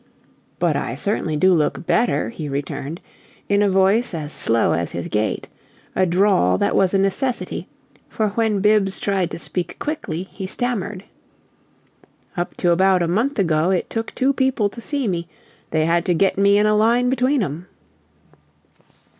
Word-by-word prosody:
"But - - +1
I - - -2
certainly 165 -6 -1
do 185 +4 +4
look 160 +1 0
better," 235 +7 +1
he 155 -9 -6
returned, 140 +3 -4 0.5
in 200 0 +2
a 205 - +3
voice 195 +3 +2
as 150 -2 -5
slow 115 0 +1
as 85 +1 -1
his 85 - -4
gait; 105 +1 -1 0.5
a 185 - +2
drawl 175 - +3
that - - 0
was 190 0 +3
a - - +5
necessity, 215 +7 -1 0.4
for 215 -1 -1
when 210 -1 0
Bibbs 210 -2 +3
tried 195 -4 0
to - - -6
speak 175 0 -4
quickly 250 - -4
he 190 0 -8
stammered. 205 -4 -3 1.3
"Up 175 -1 -4
to 175 - +2
about 185 +1 +3
a - - 0
month 230 +11 0
ago 165 -3 +2
it 185 -2 -1
took 225 0 -4
two 270 +1 +2
people 260 -6 +1
to 235 - -10
see 280 -1 -2
me. 170 -3 -2 0.4
They 155 -1 +1
had 170 +1 +2
to 180 -3 +2
get 195 +3 +2
me 200 +1 +4
in 210 - +3
a 215 - +3
line 235 +4 +3
between 260 0 +2
'em!" 170 +2 -5
195 Hz, 170 wpm, -21 LUFS, 170-220 Hz, 1.3 s, a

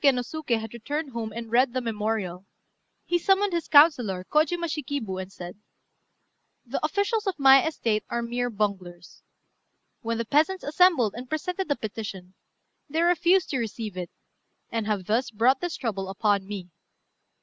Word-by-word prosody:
] - - -21
When 275 -2 +6
Hotta 250 - 0
Kôtsuké - - -12
no 315 - -4
Suké 240 -7 0
had 220 0 -8
returned 285 +5 -4
home 230 -2 -4
and 230 0 -7
read 245 +1 +3
the 260 - 0
memorial, 210 -5 -3 0.6
he 350 - +1
summoned 390 +2 +2
his 340 -1 -1
councillor, 250 - +5
Kojima 330 +3 +2
Shikibu, 280 - -3
and 190 +1 -9
said 180 +1 -9 1.1
"The - - -4
officials 410 +2 0
of 380 - -1
my 270 -1 +7
estate 225 -9 -1
are 235 0 -2
mere 245 +1 -2
bunglers. 190 -5 -4 0.8
When 230 -1 -2
the 230 - -2
peasants 315 - +2
assembled 290 - +3
and 245 +1 -8
presented 360 +4 -3
a 285 - +2
petition, 200 -5 -7 0.6
they 320 +3 +1
refused 350 +2 +3
to 265 - 0
receive 225 -3 -4
it, 180 -2 -5 0.6
and 225 -2 -2
have 205 -4 -1
thus 230 +6 0
brought 240 +5 +2
this 350 -2 -3
trouble 200 -7 -3
upon 200 -1 0
me. 190 -4 -7
235 Hz, 170 wpm, -26 LUFS, 210-310 Hz, 1.1 s, my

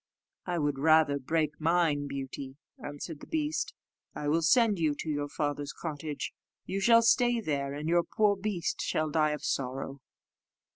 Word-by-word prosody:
"I 175 -1 -1
would 145 -3 0
rather 155 -1 +4
break 155 +2 0
mine, 160 -3 +2
Beauty," 135 0 -6 0.3
answered 145 +2 -6
the - - -11
beast; 310 -1 -1 0.4
"I 145 - -2
will 165 +2 +2
send 210 +3 +4
you 155 -3 +1
to 155 - -5
your 145 -1 -2
father's 145 -1 -2
cottage: 150 -2 -5 0.3
you 195 - -2
shall 230 +3 +6
stay 240 0 +4
there, 140 -7 -2
and 150 +2 -4
your 170 +1 +4
poor 210 +3 +2
beast 195 -4 -2
shall 155 -1 -1
die 155 0 +3
of 150 -1 -4
sorrow." 135 +1 -3
155 Hz, 160 wpm, -30 LUFS, 145-175 Hz, 0.4 s, shall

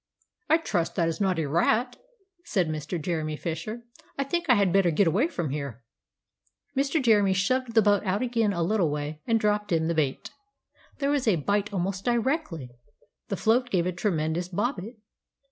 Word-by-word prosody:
"I 320 - +6
trust 175 - -2
that 170 - +2
is 165 +4 -3
not 190 -3 +1
a 160 - 0
rat," 220 - +1 0.5
said 195 - 0
Mr. 155 +3 -3
Jeremy 155 -1 -2
Fisher; 175 +9 -5 0.3
"I 275 - +1
think 335 +3 -2
I 245 - +7
had 200 -4 +2
better 195 -3 +4
get 170 +5 +3
away 200 - +2
from 170 - -3
here." 140 -5 -5 0.9
Mr. 275 +4 +1
Jeremy 210 -7 +4
shoved 235 +5 0
the 225 - +6
boat 205 0 +3
out 200 +3 0
again 230 -4 +1
a 170 -3 -1
little 185 -2 +1
way, 150 +1 -4
and 230 -1 +3
dropped 210 -1 0
in 160 -1 +2
the 170 - +1
bait. 145 -5 -1 0.7
There 280 -1 0
was 280 -4 0
a 210 - +5
bite 200 +6 0
almost 190 0 -2
directly; 235 - -1 0.6
the 195 - -3
float 240 +5 +2
gave 180 -6 +1
a 180 - 0
tremendous 175 -2 -1
bobbit! 210 +3 -2
195 Hz, 180 wpm, -27 LUFS, 165-235 Hz, 0.9 s, I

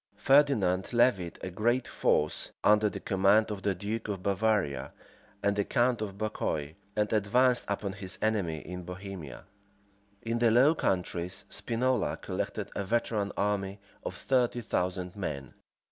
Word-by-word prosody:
Ferdinand 125 -10 +3
levied 115 -8 +2
a 95 - -4
great 120 +7 +1
force, 75 0 +1
under 105 0 +5
the - - -6
command 100 +3 +3
of 100 -2 -4
the 100 -1 0
duke 105 +5 -4
of 100 -3 -4
Bavaria 100 -6 0 0.5
and 100 0 +2
the 100 - +1
count 120 +2 +1
of 100 -2 -4
Bucquoy, 80 -8 -2 0.2
and 105 0 0
advanced 120 +4 +3
upon 100 -1 -2
his 95 -1 -7
enemy 95 -8 0
in 90 0 -7
Bohemia. 90 -3 -8 0.8
In 115 +1 -1
the 120 -1 +4
Low 130 +7 +6
Countries, 90 - -2
Spinola 125 +2 0
collected - - -4
a 100 - -1
veteran 110 -1 0
army 100 -1 -1 0.2
of - - -4
thirty 125 -2 +1
thousand 90 -3 -2
men. 70 -9 -5
100 Hz, 145 wpm, -30 LUFS, 95-115 Hz, 0.8 s, Low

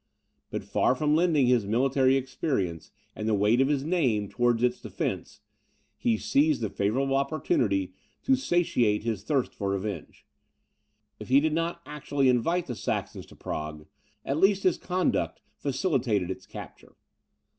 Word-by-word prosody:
But - - -4
far - - +1
from 150 +2 +1
lending 160 -5 +3
his 120 -5 +2
military 130 +4 +3
experience, 125 - -2 0.3
and 110 - -4
the 110 - +3
weight 105 +5 +3
of 135 - +3
his 140 -2 0
name, 130 - +1
towards 120 -1 +1
its 125 0 +1
defence, - - -4 0.5
he 115 -2 +1
seized 145 +2 +2
the 110 - -2
favourable 135 +7 0
opportunity 120 -9 0 0.3
to 270 - +4
satiate 145 - +1
his 110 -4 -2
thirst 135 +1 0
for 100 -2 -3
revenge. 100 -3 -4 0.9
If 110 - -8
he 135 +2 +5
did 155 +1 0
not 170 +1 -2
actually 145 -2 0
invite 165 +9 +1
the 125 - -4
Saxons 110 - -4
to - - -16
Prague, 75 0 -5 0.4
at 140 - -1
least 195 +1 +3
his 185 - +2
conduct 180 0 -1 0.2
facilitated 130 - 0
its 95 0 -8
capture. - - -11
130 Hz, 150 wpm, -27 LUFS, 105-150 Hz, 0.9 s, he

